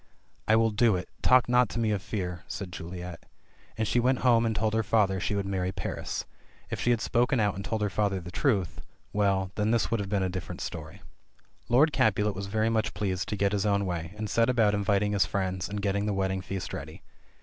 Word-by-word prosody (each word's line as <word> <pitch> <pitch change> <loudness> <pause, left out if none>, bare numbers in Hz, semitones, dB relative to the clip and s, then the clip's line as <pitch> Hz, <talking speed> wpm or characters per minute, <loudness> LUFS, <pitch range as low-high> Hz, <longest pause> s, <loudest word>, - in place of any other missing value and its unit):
'T 110 - +5
will 115 0 +3
do 110 0 +3
it; 90 - -4
talk 125 -1 +5
not 125 -2 +4
to - - -5
me 115 -2 +1
of 100 -3 -1
fear 90 -4 -4
!" - - -32
said 95 -2 -6
Juliet. 90 +1 -7 0.5
And 110 -1 0
she 125 - +2
went 125 +1 +2
home 115 -2 +5
and 110 - -1
told 110 +1 0
her 110 - +2
father 100 -3 +2
she 100 - -1
would 100 -1 -1
marry 95 -1 -1
Paris. 90 -2 -4 0.5
If - - -3
she - - +1
had 120 -2 +2
spoken 125 +3 +2
out 105 -2 +2
and 100 - -6
told 110 0 -2
her 105 - +1
father 100 -2 0
the 90 0 -9
truth... 100 - 0 0.3
well, 95 -2 +1
then 105 0 0
this 115 0 +1
would 115 - +1
have 100 -1 -4
been 100 -2 +1
a - - +1
different 90 -3 -5
story. - - -7 0.7
Lord 145 +6 +4
Capulet 105 -1 +2
was 100 +1 -5
very 110 +2 +1
much 110 -1 0
pleased 95 -4 -2
to 105 - -2
get 100 0 +2
his 100 -2 0
own 100 -1 +2
way, 85 0 -4
and 110 0 -3
set 115 +3 +2
about 115 -4 +3
inviting 100 0 +1
his 100 -1 +2
friends 95 -2 -2
and 100 0 -4
gettinp 100 0 0
the 105 - 0
wedding 95 0 0
feast 95 0 -5
ready. - - -7
105 Hz, 235 wpm, -28 LUFS, 95-110 Hz, 0.7 s, T